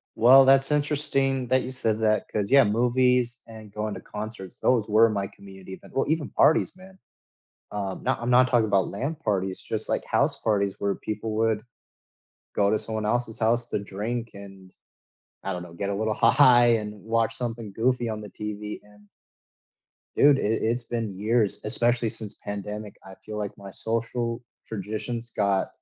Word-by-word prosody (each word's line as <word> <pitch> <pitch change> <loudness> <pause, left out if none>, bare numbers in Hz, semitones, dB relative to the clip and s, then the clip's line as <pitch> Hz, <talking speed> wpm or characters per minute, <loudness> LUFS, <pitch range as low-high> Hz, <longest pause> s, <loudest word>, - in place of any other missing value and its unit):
Well, 130 +4 +8
that's 135 +2 +4
interesting 135 -3 0
that 130 +2 +3
you 130 - -5
said 115 -4 -1
that, 110 -2 +1
'cause, 105 +1 -2
yeah, 140 0 +8
movies 125 +2 +2
and 110 -2 -12
going 105 0 -3
to - - -8
concerts, 105 -3 -8
those 115 -5 +2
were 110 +2 +5
my 100 -2 -2
community, 95 -1 -12
but - - -15
well, 135 - +1
even 155 -2 0
parties, 160 - +3
man. 190 0 -16 0.7
Um, 100 -2 -4
nah, 130 0 +1
I'm 120 +1 -3
not 125 +1 +5
talking 120 -3 +3
about 100 -2 +2
land 145 +10 -4
parties, 95 - -1
just, - - -4
like, - - -1
house - - +1
parties, 100 -3 0
where 100 -1 0
people 110 +1 -5
would 110 -1 +1 0.9
go 100 0 +2
to 110 - +2
someone 110 -1 -3
else's 120 0 -1
house 120 +1 +1
to 100 - -2
drink, 115 +4 -4
and, 95 -2 -12 0.7
I 95 - -3
don't 90 -1 -4
know, 85 -1 -12
get 100 +3 -3
a 100 - -1
little 110 +1 0
high, 125 -1 +6
and 105 -1 -7
watch 115 0 0
something 115 -4 -5
goofy 120 +1 0
on 110 -1 -4
the 105 - -9
TV, 105 0 -6
and 105 0 -21 1.1
dude, 145 -1 +5
i - - -2
it's 115 +3 0
been 115 -4 -3
years, 105 +2 0
especially 120 +2 +1
since 105 -1 -4
the - - -25
pandemic, 105 +1 -6
I 95 0 -11
feel 105 0 -6
like 105 -1 -4
my 100 -1 -10
social 115 +2 -3 0.2
traditions 110 +3 -5
got 100 -2 +1
110 Hz, 180 wpm, -25 LUFS, 105-120 Hz, 1.1 s, Well